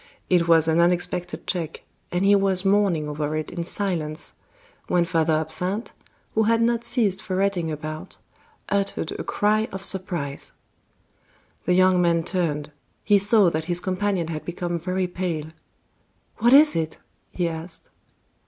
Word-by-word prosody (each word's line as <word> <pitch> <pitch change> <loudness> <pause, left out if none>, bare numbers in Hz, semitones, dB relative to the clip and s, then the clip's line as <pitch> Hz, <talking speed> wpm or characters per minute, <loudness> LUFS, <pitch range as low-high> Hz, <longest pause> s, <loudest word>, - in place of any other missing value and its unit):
It 175 -2 +4
was 165 -1 +5
an 160 +1 +3
unexpected 175 0 0
check, 165 -3 -3 0.3
and 180 +2 0
he 200 - +6
was 195 -1 +2
mourning 195 -6 +2
over 150 0 -2
it 155 -1 -3
in 170 -1 -3
silence, 170 -4 -3 0.5
when 175 -1 +2
Father 165 -2 +1
Absinthe, 180 +7 -2 0.4
who 220 - +2
had 225 +1 +3
not 235 0 +1
ceased 215 -7 0
ferreting 185 -3 -1
about, 155 +1 -6 0.5
uttered 200 -4 -1
a - - -3
cry 215 +2 +1
of 195 0 -6
surprise. 175 -7 -2 1.1
The 180 - +2
young 185 0 +4
man 170 -1 +2
turned; 155 -5 -2 0.3
he 205 -2 +4
saw 200 -2 +4
that 160 0 -2
his 175 0 +1
companion 185 -2 -1
had 155 -2 -4
become 175 0 -3
very 185 +2 -1
pale. 175 -4 -3 0.9
"What 235 +2 +3
is 295 +3 +7
it?" 160 -1 -2 0.3
he 175 -2 -1
asked. 165 +1 -6
180 Hz, 145 wpm, -24 LUFS, 160-195 Hz, 1.1 s, is